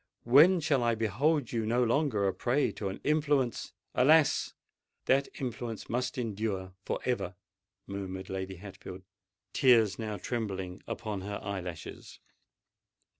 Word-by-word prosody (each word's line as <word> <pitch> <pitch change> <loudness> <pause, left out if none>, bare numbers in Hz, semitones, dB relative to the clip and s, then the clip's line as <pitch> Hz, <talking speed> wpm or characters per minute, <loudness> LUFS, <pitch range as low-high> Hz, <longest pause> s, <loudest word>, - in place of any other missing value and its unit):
When 155 +10 +7
shall 145 -4 +2
I 120 -1 +2
behold 120 - +1
you 115 -2 -1
no 120 +3 +2
longer 120 -5 +1
a 95 - 0
prey 130 +4 +1
to 100 - -4
an 95 - -6
influence——" 145 -5 +1 0.2
"Alas! 150 +3 +4 0.5
that 135 +1 +3
influence 120 -3 -5
must 125 +2 -2
endure 105 -5 -3
for - - -2
ever!" 120 -7 -1 0.5
murmured 95 -1 -5
Lady 95 0 -4
Hatfield, 95 0 -10 0.5
tears 115 -7 +4
now 110 -2 -3
trembling 95 -4 -4
upon 105 -4 -4
her 100 +1 -4
eye 100 -1 -3
lashes. 85 -3 -8
115 Hz, 130 wpm, -30 LUFS, 95-130 Hz, 0.5 s, When